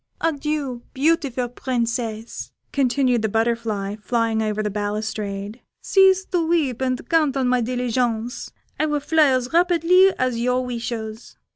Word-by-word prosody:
Adieu, 295 -5 -2
beautiful 270 -4 +1
Princess," 235 -2 -3 0.2
continued 255 -3 +2
the 220 - 0
butterfly, 225 -2 -1
flying 225 0 0
over 215 -1 -1
the 210 - -2
balustrade; 210 +1 -4 0.2
"cease 380 -1 +4
to 350 -3 0
weep, 310 -7 0
and 255 -1 -1
count 305 -5 +2
on 260 -2 +1
my 250 0 +2
diligence, 245 -1 -1 0.3
I 310 - +2
will 295 -1 0
fly 310 +1 +3
as 255 0 0
rapidly 355 +2 +5
as 255 -2 0
your 250 +1 +1
wishes." 230 -2 -5
250 Hz, 135 wpm, -22 LUFS, 225-290 Hz, 0.3 s, rapidly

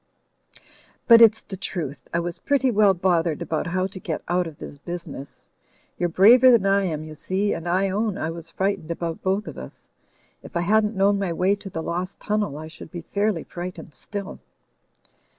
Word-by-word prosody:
"But 230 -1 +9
it's 225 -1 +6
the 195 - -7
truth 160 -6 -5
I - - 0
was 170 0 -4
pretty 270 -2 +1
well 205 -3 +4
bothered 170 -3 +1
about 160 +2 -2
how 185 +2 0
to 190 0 -7
get 165 -4 -4
out 180 0 +1
of 155 -3 -10
this 145 - -10
business. 165 -4 -8 0.5
You're 175 - +1
braver 235 +9 +7
than 235 -5 +5
I 195 0 +3
am, 155 -4 -3
you 155 0 -9
see, 190 +6 -1
and 170 +1 -4
I 190 +2 +1
own 205 0 -1
I 160 -4 -2
was 165 0 -9
frightened 190 -2 -2
about 170 -1 -4
both 195 +3 0
of - - -8
us. - - -12 0.5
If - - -6
I - - +1
hadn't 210 +4 +2
known 200 +1 +3
my 195 -3 -1
way 185 +4 +2
to 200 - -9
the 160 -3 -5
lost 180 +3 -4
tunnel, 210 -8 -1
I 155 +1 -7
should 160 0 -11
be 170 +1 -7
fairly 200 0 -1
frightened 175 -2 -8
still." 200 - -7
185 Hz, 195 wpm, -24 LUFS, 165-200 Hz, 0.5 s, But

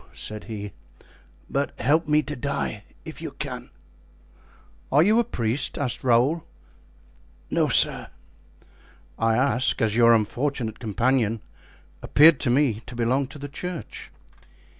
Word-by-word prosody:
said 105 0 -7
he, 105 -3 -6 0.8
"but 140 +1 -3
help 155 +4 +2
me 150 0 +3
to 150 +1 -5
die, 140 -5 -3 0.2
if - - -9
you - - -4
can." - - -7 1.2
"Are 145 +3 +5
you 215 +5 +4
a - - +4
priest?" 120 - -2
asked 130 -4 -2
Raoul. 130 +7 +2 1.1
"No - - +2
sir." - - +4 1.1
"I 115 0 +2
ask, 130 -1 +1
as 110 -1 +1
your 115 0 +6
unfortunate 115 +1 -2
companion 115 0 0 0.6
appeared 155 0 +6
to - - -1
me 125 -4 +2
to 125 - -9
belong 125 +3 0
to 145 - -11
the 145 0 -7
church." 175 +3 -7
125 Hz, 130 wpm, -24 LUFS, 115-145 Hz, 1.2 s, your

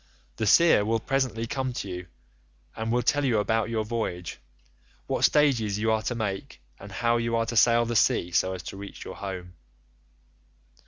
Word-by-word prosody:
The 110 - -1
seer 165 - +6
will 115 +2 0
presently 125 -2 -1
come 130 +1 -3
to 110 - -5
you, 90 -1 -6 0.7
and 110 0 -3
will 120 +1 +1
tell 145 +4 +2
you 125 -5 +2
about 110 +2 0
your 110 -2 -1
voyage—what 65 - -6
stages 120 -9 +3
you 110 +1 +1
are 110 -1 +1
to 120 - -3
make, 100 -4 -4 0.2
and 100 +1 -11
how 115 +5 +1
you 115 0 -1
are 115 0 +1
to 120 - -4
sail 115 +1 +5
the 120 0 -3
sea 90 -4 +2
so 95 +2 +1
as 90 -3 -7
to 95 - -8
reach 100 0 -9
your - - -8
home. 95 -3 -6
110 Hz, 180 wpm, -26 LUFS, 95-120 Hz, 0.7 s, seer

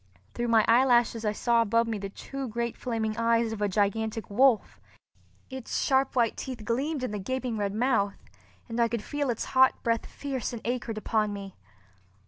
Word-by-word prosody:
Through 240 - -2
my 225 -2 +4
eyelashes 240 -1 +4
I 210 - +2
saw 235 +2 +2
above 230 +1 +2
me 220 -2 -2
the 195 0 -5
two 270 +6 -6
great 235 +1 -3
flaming 220 -3 -2
eyes 230 0 +2
of 215 - -6
a 205 - +1
gigantic 215 +3 -1
wolf. 245 +1 +3 0.7
Its 260 -2 -4
sharp 265 -1 +2
white 235 -3 +2
teeth 245 -5 -6
gleamed 270 +5 -1
in 255 - -2
the 210 - -3
gaping 255 +3 -3
red 205 -1 -2
mouth, 220 -4 +1 0.5
and 230 0 -4
I 235 - +4
could 230 -2 -3
feel 290 +1 -2
its 230 - -2
hot 260 0 +4
breath 230 -1 0
fierce 265 -3 -4
and 230 - -6
acrid 240 -2 -2
upon 215 -1 0
me. 195 -1 -8
230 Hz, 185 wpm, -28 LUFS, 215-255 Hz, 0.7 s, my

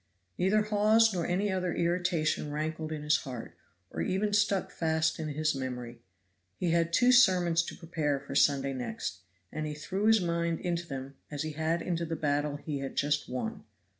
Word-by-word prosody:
Neither 205 +4 +3
Hawes 215 +1 +4
nor 175 -3 -1
any 195 +3 0
other 185 -2 -1
irritation 170 -3 0
rankled 155 +1 -3
in 155 -1 -4
his 150 +1 +4
heart, 125 -6 -7 0.4
or 80 - -3
even 205 - 0
stuck 205 -2 +2
fast 160 -1 0
in 160 - -3
his 155 +1 0
memory. 125 -3 -5 0.6
He 175 - 0
had 165 0 +2
two 245 +8 +5
sermons 180 -9 +5
to 170 - -6
prepare 155 -5 -1
for 140 0 -8
Sunday 140 -1 +3
next, 110 -6 -4 0.3
and 155 0 -3
he 150 - -4
threw 190 +7 -2
his 220 0 +6
mind 170 -2 -1
into 170 -1 -2
them 135 -1 -6
as 145 0 -3
he 155 - -3
had 160 +2 -1
into 170 -1 -1
the 165 - -2
battle 145 -1 0
he 145 0 -4
had 135 0 -5
just 145 +1 +1
won. 205 - -4
160 Hz, 185 wpm, -30 LUFS, 145-180 Hz, 0.6 s, his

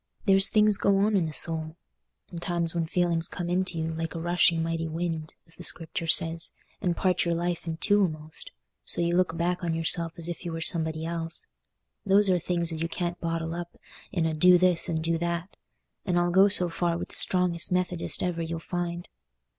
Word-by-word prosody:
There's 195 -1 +4
things 210 -1 +3
go 200 -1 +2
on 205 +2 +2
in 175 -4 +1
the - - -5
soul, 160 0 +3 0.6
and 170 - -7
times 170 -2 -2
when 165 -2 -2
feelings 170 -1 0
come 175 -1 -5
into 180 -1 -1
you 160 0 -3
like 165 0 -5
a - - -4
rushing 170 -1 +2
mighty 165 0 -2
wind, 160 -1 -4
as 165 - -12
the - - -9
Scripture 165 0 +1
says, 165 +1 +3 0.3
and 175 -3 -1
part 185 -2 +1
your 170 -1 -1
life 175 0 -3
in 160 -1 -3
two 205 +3 +2
a'most, 155 -1 -7 0.3
so - - +3
you 170 0 +1
look 175 -2 +1
back 175 +2 -1
on 165 -1 -1
yourself 165 0 +1
as 170 -1 +1
if 175 -1 -6
you 170 -2 -5
was 165 0 -2
somebody 160 -2 0
else. 165 - 0 0.6
Those 200 0 +4
are 180 - +2
things 170 0 0
as 160 -1 -4
you 165 - -2
can't 175 0 -4
bottle 165 -1 -3
up 175 0 -7 0.3
in 170 -4 -1
a 160 - -1
'do 180 +3 +5
this' 180 0 +2
and 160 -1 -2
'do 165 0 0
that'; 170 +3 -4 0.5
and 180 -2 -1
I'll 175 0 +1
go 190 +3 +6
so 185 -3 +2
far 170 0 -1
with - - -6
the - - -11
strongest 180 -2 +2
Methodist 180 -1 0
ever 175 -2 -2
you'll 165 0 -4
find. 175 0 -5
170 Hz, 210 wpm, -26 LUFS, 165-180 Hz, 0.6 s, go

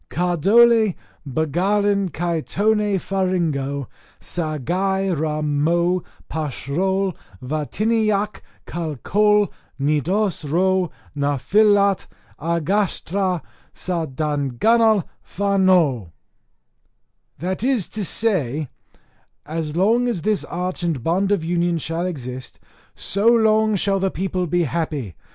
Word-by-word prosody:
KARDOL 205 +5 +4 0.3
BAGARLAN 190 +8 +1
KAI 170 0 -1
TON 210 +2 +1
FARINGO 165 -9 -1 0.3
SARGAI 180 +5 -1
RA 155 0 -1
MO 170 +5 +1 0.3
PASHROL 175 +6 -1 0.3
VATINEAC 210 - 0 0.2
CAL 165 -3 -4
COLNITOS 195 - +1
RO 185 +3 +1 0.2
NA 145 -1 0
FILNAT 200 - +3 0.3
AGASTRA 180 +2 0 0.3
SA 170 -3 -2
DINGANNAL 155 - +2
FANO. 185 - +2 1.3
That 185 +5 -3
is 250 -7 +1
to 215 - -3
say, 155 - 0 0.8
"As 155 -1 -4
long 225 +7 +3
as 210 -9 -2
this 210 -1 +1
arch 180 +1 -4
and 165 -8 -2
bond 190 +4 +1
of 200 -5 +1
union 175 0 +1
shall 165 +3 -2
exist, 130 -6 -6 0.4
so 200 +4 -1
long 220 -2 +4
shall 195 0 +1
the 190 0 +1
people 185 -1 -2
be 175 +2 +1
happy. 150 - -3
180 Hz, 95 wpm, -21 LUFS, 155-200 Hz, 1.3 s, KARDOL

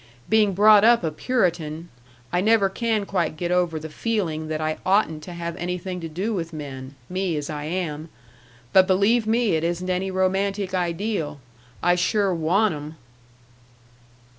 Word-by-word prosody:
Being 215 -2 +3
brought 210 +1 +7
up 235 -2 +5
a 160 - 0
Puritan, 170 -5 -1 0.4
I 175 - +2
never 210 -1 +3
can 220 0 -1
quite 170 -6 -1
get 175 +2 -2
over 175 -3 +1
the 155 - -7
feeling 160 -3 -2
that 155 0 -3
I 155 0 -2
oughtn't 185 -5 +2
to 180 - -8
have 170 -1 -5
anything 180 +1 -4
to 165 - -5
do 190 +8 -2
with 170 -4 -3
men 135 -3 -7
me 185 -3 -2
as 150 +1 -4
I 150 -1 -5
am 160 -2 -3 0.6
but 190 -1 +6
believe 215 +4 +3
me 230 -1 +2
it 160 0 0
isn't 175 +2 -1
any 185 +1 -1
romantic 190 +1 0
ideal. 175 -3 -2 0.4
I 175 - +4
sure 195 +2 +1
want 180 +6 +2
'em." 150 +1 -7
180 Hz, 165 wpm, -23 LUFS, 160-200 Hz, 0.6 s, brought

